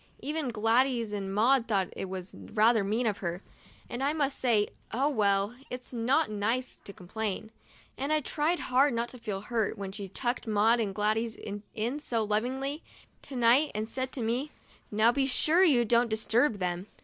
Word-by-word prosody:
Even 300 Hz, 0 st, -2 dB
Gladys 230 Hz, +1 st, +2 dB
and 195 Hz, -2 st, -3 dB
Maud 235 Hz, +5 st, +3 dB
thought 195 Hz, -4 st, +1 dB
it 190 Hz, -, -5 dB
was 185 Hz, 0 st, -6 dB
rather 220 Hz, 0 st, +2 dB
mean 220 Hz, +5 st, 0 dB
of 205 Hz, -3 st, 0 dB
her, 175 Hz, 0 st, -4 dB, 0.4 s
and 245 Hz, -, -5 dB
I 285 Hz, +2 st, +2 dB
must 285 Hz, -3 st, -1 dB
say 225 Hz, -5 st, +2 dB
— -, -, -31 dB
oh, 270 Hz, +5 st, +1 dB
well, 200 Hz, -4 st, +1 dB, 0.2 s
it's 250 Hz, +1 st, -7 dB
not 255 Hz, +7 st, +2 dB
nice 225 Hz, +5 st, -1 dB
to -, -, -7 dB
complain, 215 Hz, +3 st, -5 dB, 0.5 s
and 275 Hz, +3 st, -1 dB
I 310 Hz, -, +4 dB
tried 305 Hz, +4 st, 0 dB
hard 260 Hz, +1 st, +3 dB
not 235 Hz, +1 st, -1 dB
to 250 Hz, -, -11 dB
feel 210 Hz, -4 st, -4 dB
hurt 225 Hz, 0 st, -1 dB
when 195 Hz, -1 st, -5 dB
she 200 Hz, 0 st, -6 dB
tucked 240 Hz, +5 st, -2 dB
Maud 220 Hz, +2 st, +3 dB
and 200 Hz, -4 st, -1 dB
Gladys 220 Hz, +2 st, 0 dB, 0.4 s
in 240 Hz, +7 st, -2 dB
so 230 Hz, -6 st, -1 dB
lovingly 260 Hz, +8 st, -1 dB, 0.4 s
to 275 Hz, -, -7 dB
night 245 Hz, +5 st, +4 dB
and 215 Hz, +1 st, -2 dB
said 260 Hz, +2 st, -3 dB
to 250 Hz, -, -3 dB
me, 245 Hz, +6 st, -1 dB, 0.2 s
" -, -, -27 dB
Now 215 Hz, +2 st, +4 dB
be 270 Hz, +2 st, +1 dB
sure 315 Hz, +7 st, +3 dB
you 260 Hz, -10 st, +5 dB
don't 235 Hz, +1 st, +3 dB
dis 220 Hz, 0 st, -1 dB
turb 240 Hz, +1 st, +3 dB
them." 180 Hz, 0 st, -3 dB
230 Hz, 195 wpm, -29 LUFS, 210-260 Hz, 0.5 s, you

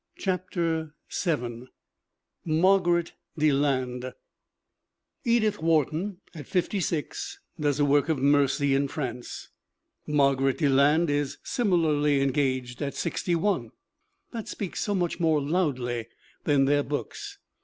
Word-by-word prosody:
CHAPTER 170 Hz, -4 st, -2 dB, 0.2 s
VII 125 Hz, -, -2 dB, 0.8 s
MARGARET 175 Hz, +1 st, +3 dB, 0.2 s
DELAND 130 Hz, -4 st, +1 dB, 1.1 s
EDITH 220 Hz, -4 st, +2 dB
WHARTON, 165 Hz, +4 st, +1 dB, 0.2 s
at 150 Hz, -6 st, -9 dB
56, 200 Hz, -, -2 dB, 0.2 s
does 145 Hz, -1 st, +1 dB
a 145 Hz, -, +4 dB
work 145 Hz, +2 st, +3 dB
of 160 Hz, -, +2 dB
mercy 140 Hz, 0 st, +3 dB
in 140 Hz, +1 st, +2 dB
France; 125 Hz, -4 st, -5 dB, 0.6 s
Margaret 140 Hz, -2 st, +2 dB
Deland 145 Hz, +2 st, +3 dB
is 145 Hz, -1 st, -1 dB
similarly 155 Hz, -, +2 dB
engaged 130 Hz, -2 st, 0 dB
at 140 Hz, -1 st, -3 dB
61. 180 Hz, +3 st, -1 dB, 0.6 s
That 230 Hz, -3 st, -6 dB
speaks 195 Hz, -4 st, -5 dB
so 205 Hz, -, 0 dB
much 175 Hz, -3 st, -1 dB
more 160 Hz, -3 st, +3 dB
loudly 135 Hz, -7 st, -1 dB, 0.4 s
than 140 Hz, -2 st, +4 dB
their 145 Hz, +1 st, +3 dB
books. 400 Hz, -, -5 dB
150 Hz, 105 wpm, -27 LUFS, 140-175 Hz, 1.1 s, a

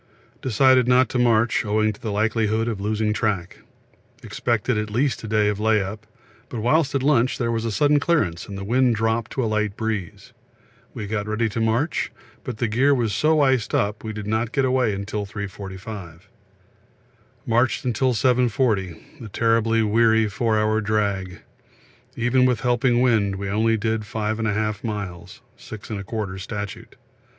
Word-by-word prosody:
We -, -, -33 dB
decided 130 Hz, +2 st, +4 dB
not 125 Hz, +1 st, +4 dB
to 125 Hz, -, -1 dB
march 120 Hz, -1 st, +3 dB
owing 110 Hz, 0 st, +1 dB
to 110 Hz, +2 st, -6 dB
likelihood 110 Hz, +1 st, 0 dB
of 110 Hz, -4 st, -3 dB
losing 105 Hz, +1 st, 0 dB
track; 100 Hz, -6 st, -2 dB, 0.6 s
expected 120 Hz, 0 st, -1 dB
at 105 Hz, 0 st, -2 dB
least 125 Hz, +5 st, 0 dB
a -, -, -5 dB
day 105 Hz, -1 st, +2 dB
of 105 Hz, -1 st, -1 dB
lay 110 Hz, 0 st, +3 dB
up, 105 Hz, +3 st, -6 dB, 0.4 s
but 120 Hz, -, -5 dB
whilst 140 Hz, +5 st, +2 dB
at 135 Hz, -, 0 dB
lunch 130 Hz, -3 st, +2 dB
there 120 Hz, -2 st, -1 dB
was 115 Hz, 0 st, -2 dB
a 115 Hz, -, -1 dB
sudden 145 Hz, +6 st, +3 dB
clearance 145 Hz, -, 0 dB
and 100 Hz, -1 st, -7 dB
wind 125 Hz, +2 st, +2 dB
dropped 115 Hz, +1 st, 0 dB
to 130 Hz, -, -1 dB
light 110 Hz, -2 st, -1 dB
breeze. 110 Hz, -5 st, -4 dB, 0.6 s
We 105 Hz, -, -5 dB
got 105 Hz, 0 st, -3 dB
ready 110 Hz, +2 st, 0 dB
to 115 Hz, +2 st, -3 dB
march, 115 Hz, +8 st, 0 dB, 0.3 s
but 125 Hz, -3 st, -5 dB
gear 135 Hz, +5 st, +3 dB
was 115 Hz, -5 st, 0 dB
so 155 Hz, +8 st, +3 dB
iced 130 Hz, -5 st, +2 dB
up 105 Hz, +1 st, -1 dB
we 110 Hz, -, -4 dB
did 105 Hz, -1 st, -6 dB
not 110 Hz, +2 st, -1 dB
get 135 Hz, -1 st, +1 dB
away 125 Hz, -5 st, +1 dB
till 105 Hz, 0 st, -4 dB
3.45. 95 Hz, -3 st, -8 dB, 1.2 s
Marched 120 Hz, +1 st, +1 dB
till 125 Hz, +2 st, +1 dB
7.40 120 Hz, -, 0 dB
a 110 Hz, -, -8 dB
terribly 115 Hz, +1 st, +2 dB
weary 110 Hz, +1 st, +3 dB
four 110 Hz, +2 st, 0 dB
hour 110 Hz, +1 st, +1 dB
drag; 100 Hz, -3 st, -1 dB, 0.7 s
even 125 Hz, +2 st, +3 dB
with 125 Hz, -4 st, 0 dB
helping 125 Hz, -1 st, +2 dB
wind 110 Hz, -6 st, +2 dB
we 100 Hz, 0 st, -4 dB
only 110 Hz, +3 st, +2 dB
did 110 Hz, 0 st, -2 dB
5 110 Hz, +1 st, -2 dB
1/2 110 Hz, -1 st, -1 dB
miles 100 Hz, -6 st, -6 dB, 0.2 s
(6 110 Hz, -2 st, -10 dB
1/4 100 Hz, -2 st, -4 dB
statute). 100 Hz, 0 st, -7 dB
110 Hz, 160 wpm, -23 LUFS, 105-120 Hz, 1.2 s, decided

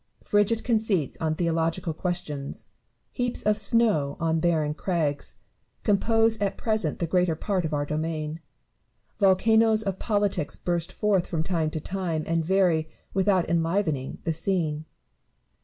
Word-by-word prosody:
Frigid 205 Hz, +2 st, +2 dB
conceits 215 Hz, -, 0 dB
on 155 Hz, -1 st, 0 dB
theological 165 Hz, 0 st, 0 dB
questions, 155 Hz, -5 st, -4 dB, 0.5 s
heaps 245 Hz, -1 st, -2 dB
of 210 Hz, 0 st, +3 dB
snow 200 Hz, -9 st, +2 dB
on 165 Hz, 0 st, +1 dB
barren 160 Hz, -3 st, +1 dB
crags, 155 Hz, -4 st, -2 dB, 0.5 s
compose 225 Hz, +1 st, +3 dB
at 200 Hz, -1 st, 0 dB
present 215 Hz, -9 st, 0 dB
the 170 Hz, -, -1 dB
greater 180 Hz, 0 st, +1 dB
part 185 Hz, +1 st, -1 dB
of 160 Hz, -, -3 dB
our 145 Hz, -1 st, 0 dB
domain: 155 Hz, +1 st, -3 dB, 0.8 s
volcanoes 220 Hz, +3 st, +4 dB
of 195 Hz, -2 st, -3 dB
politics 205 Hz, -8 st, 0 dB
burst 175 Hz, -1 st, -2 dB
forth 200 Hz, -4 st, +1 dB
from 160 Hz, -2 st, -1 dB
time 165 Hz, -3 st, 0 dB
to 155 Hz, -, -4 dB
time, 170 Hz, -2 st, -3 dB
and 165 Hz, 0 st, 0 dB
vary, 175 Hz, -3 st, +2 dB, 0.3 s
without 190 Hz, -2 st, +2 dB
enlivening, 165 Hz, -4 st, 0 dB
the 165 Hz, -, 0 dB
scene. 160 Hz, -3 st, -1 dB
175 Hz, 135 wpm, -26 LUFS, 160-205 Hz, 0.8 s, volcanoes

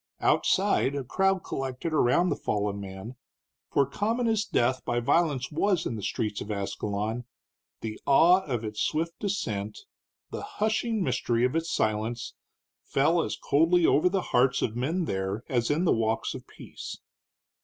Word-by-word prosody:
Outside 140 Hz, -, +2 dB
a 140 Hz, -, -2 dB
crowd 190 Hz, +7 st, +1 dB
collected 135 Hz, +5 st, -4 dB
around 155 Hz, +5 st, +3 dB
the -, -, +1 dB
fallen 100 Hz, -1 st, -2 dB
man, 95 Hz, +5 st, -8 dB, 0.5 s
for 140 Hz, -, +3 dB
common 220 Hz, -, -1 dB
as 220 Hz, -2 st, +2 dB
death 130 Hz, -, +1 dB
by 120 Hz, -1 st, 0 dB
violence 140 Hz, +1 st, +1 dB
was 175 Hz, +2 st, +1 dB
in 115 Hz, -, -2 dB
the 105 Hz, -, -5 dB
streets 105 Hz, +1 st, -2 dB
of 105 Hz, -, -7 dB
Ascalon, 105 Hz, +3 st, -3 dB, 0.6 s
the 110 Hz, -1 st, -6 dB
awe 170 Hz, +7 st, +6 dB
of 120 Hz, -5 st, -2 dB
its 105 Hz, -1 st, -4 dB
swift 165 Hz, +2 st, -1 dB
descent, 110 Hz, -, -3 dB, 0.5 s
the -, -, -4 dB, 0.2 s
hushing 220 Hz, 0 st, 0 dB
mystery 120 Hz, -3 st, +1 dB
of 125 Hz, -, -1 dB
its 165 Hz, 0 st, -1 dB
silence, 110 Hz, +1 st, -1 dB, 0.5 s
fell 160 Hz, +5 st, +2 dB
as -, -, -3 dB
coldly 165 Hz, +4 st, +3 dB
over 155 Hz, +5 st, +4 dB
the 190 Hz, 0 st, 0 dB
hearts 125 Hz, +2 st, +3 dB
of 110 Hz, -, -1 dB
men 160 Hz, +9 st, -1 dB
there 95 Hz, -1 st, -2 dB
as 120 Hz, -2 st, 0 dB
in 155 Hz, +5 st, +1 dB
the -, -, +4 dB
walks 110 Hz, 0 st, 0 dB
of -, -, -9 dB
peace. -, -, -9 dB
130 Hz, 160 wpm, -27 LUFS, 110-170 Hz, 0.6 s, awe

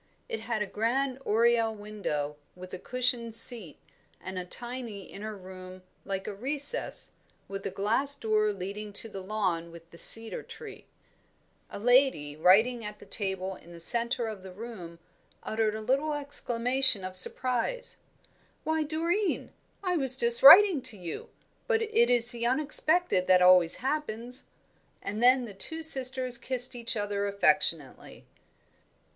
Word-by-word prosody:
It 455 Hz, -2 st, -5 dB
had 220 Hz, -3 st, -3 dB
a -, -, -5 dB
grand 250 Hz, +6 st, -2 dB
oriel 230 Hz, 0 st, +1 dB
window, 200 Hz, -9 st, -5 dB, 0.2 s
with 180 Hz, 0 st, -12 dB
a 185 Hz, -, -6 dB
cushioned 245 Hz, -1 st, -3 dB
seat, 225 Hz, -, -2 dB, 0.4 s
and 185 Hz, 0 st, -7 dB
a 180 Hz, -, -7 dB
tiny 235 Hz, 0 st, -7 dB
inner 210 Hz, +3 st, -9 dB
room 185 Hz, 0 st, -12 dB, 0.2 s
like 195 Hz, 0 st, -5 dB
a 210 Hz, -, -6 dB
recess, 285 Hz, -, -4 dB, 0.4 s
with 195 Hz, 0 st, -6 dB
a -, -, -3 dB
glass 245 Hz, +8 st, +1 dB
door 215 Hz, -4 st, 0 dB
leading 200 Hz, +2 st, -7 dB
to 225 Hz, -, +1 dB
the 195 Hz, -2 st, -8 dB
lawn 185 Hz, -4 st, -3 dB
with 165 Hz, 0 st, -15 dB
the 170 Hz, -, -14 dB
cedar 225 Hz, 0 st, +5 dB
tree. -, -, -12 dB, 0.8 s
A -, -, -8 dB
lady 245 Hz, -, +2 dB
writing 220 Hz, +9 st, +3 dB
at 210 Hz, 0 st, -8 dB
a -, -, -14 dB
table 190 Hz, -2 st, -3 dB
in 175 Hz, -1 st, -16 dB
the 170 Hz, -, -12 dB
centre 235 Hz, +6 st, +1 dB
of 215 Hz, -3 st, -7 dB
the 190 Hz, 0 st, -11 dB
room 185 Hz, -5 st, -10 dB, 0.5 s
uttered 220 Hz, -1 st, -2 dB
a 220 Hz, -, -6 dB
little 275 Hz, +7 st, -1 dB
exclamation 260 Hz, -5 st, +2 dB
of 185 Hz, 0 st, -7 dB
surprise. 255 Hz, -, +1 dB, 0.7 s
"Why, 315 Hz, 0 st, -1 dB
Doreen, 335 Hz, +6 st, -2 dB, 0.3 s
I 360 Hz, -2 st, -1 dB
was 265 Hz, -3 st, +3 dB
just 235 Hz, -1 st, +5 dB
writing 350 Hz, +1 st, +8 dB
to 240 Hz, -4 st, -8 dB
you; 175 Hz, -3 st, -8 dB, 0.4 s
but 455 Hz, -2 st, +1 dB
it 450 Hz, +2 st, +1 dB
is 240 Hz, -1 st, +1 dB
the 235 Hz, -1 st, -3 dB
unexpected 305 Hz, -, 0 dB
that 180 Hz, -1 st, +4 dB
always 180 Hz, -2 st, +4 dB
happens." 250 Hz, -4 st, -4 dB, 0.5 s
And 210 Hz, +3 st, -6 dB
then 250 Hz, +1 st, +4 dB
the 210 Hz, -, -10 dB
two 320 Hz, +12 st, 0 dB
sisters 255 Hz, -4 st, +3 dB
kissed 255 Hz, -1 st, +1 dB
each 235 Hz, -1 st, -2 dB
other 205 Hz, -1 st, -3 dB
affectionately. 185 Hz, -7 st, +1 dB
225 Hz, 150 wpm, -27 LUFS, 195-260 Hz, 0.8 s, writing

